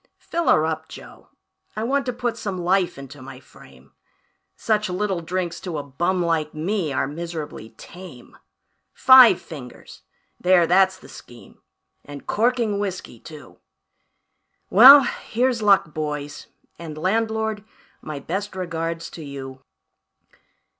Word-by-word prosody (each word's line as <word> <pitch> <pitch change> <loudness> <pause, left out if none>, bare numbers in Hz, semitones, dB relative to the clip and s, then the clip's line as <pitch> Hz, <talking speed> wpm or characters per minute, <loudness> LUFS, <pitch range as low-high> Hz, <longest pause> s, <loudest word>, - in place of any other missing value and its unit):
"Fill 340 0 -4
her 155 - +4
up, 160 0 -4
Joe, - - -13 0.5
I 215 - -3
want 270 +3 -1
to - - 0
put 240 -1 -3
some 195 -3 -5
life 180 -1 0
into 140 0 -11
my 130 -1 -11
frame 70 - -19 0.6
Such 215 -2 -1
little 190 -1 -2
drinks 175 +1 -4
to 175 -4 -6
a 145 - -4
bum 175 +6 -1
like 155 -3 -1
me 170 0 -2
are 135 - 0
miserably 155 -5 -7
tame; 175 -9 -13 0.6
Five 260 -7 +7
fingers 135 -6 -12 0.4
there, 180 -1 +4
that's 190 +2 +3
the - - -16
scheme 120 -1 -15 0.4
and 145 -1 -11
corking 230 -2 0
whiskey, 185 - -5
too. 155 +2 -13 1.1
Well, 265 +8 +10
here's 245 0 -2
luck, 195 -7 +3
boys, 150 -1 -5 0.3
and 160 -3 -8
landlord, 220 +3 -1 0.4
my 155 -1 -7
best 190 +7 -5
regards 165 -2 -4
to 160 - -9
you. 135 -2 -9
175 Hz, 130 wpm, -22 LUFS, 150-210 Hz, 1.1 s, Well